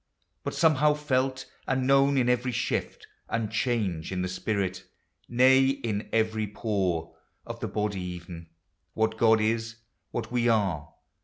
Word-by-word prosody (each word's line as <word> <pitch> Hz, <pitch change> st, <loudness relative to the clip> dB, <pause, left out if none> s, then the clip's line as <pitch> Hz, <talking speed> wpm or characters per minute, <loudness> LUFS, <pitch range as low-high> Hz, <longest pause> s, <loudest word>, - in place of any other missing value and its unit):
But -, -, -4 dB
somehow 150 Hz, -2 st, +4 dB
felt 130 Hz, -3 st, -1 dB, 0.2 s
and 130 Hz, -1 st, 0 dB
known 135 Hz, +1 st, +4 dB
in 125 Hz, -2 st, +2 dB
every 125 Hz, +1 st, +1 dB
shift -, -, -2 dB, 0.2 s
And 115 Hz, -2 st, -1 dB
change 110 Hz, -9 st, -1 dB
in 90 Hz, -1 st, -2 dB
the -, -, -1 dB
spirit, 95 Hz, 0 st, -2 dB, 0.3 s
— -, -, -51 dB
nay, 130 Hz, +2 st, +5 dB
in 115 Hz, -6 st, -2 dB
every 110 Hz, -1 st, +1 dB
pore 100 Hz, -5 st, -2 dB, 0.3 s
Of -, -, -7 dB
the -, -, -3 dB
body, 105 Hz, -2 st, -2 dB
even,) 85 Hz, -2 st, -7 dB, 0.2 s
— 85 Hz, -2 st, -49 dB
what 110 Hz, 0 st, +1 dB
God 110 Hz, 0 st, +4 dB
is, 115 Hz, +1 st, -1 dB, 0.3 s
what 115 Hz, -1 st, -4 dB
we 120 Hz, -1 st, +2 dB
are. 95 Hz, -9 st, 0 dB
110 Hz, 155 wpm, -27 LUFS, 95-130 Hz, 0.3 s, nay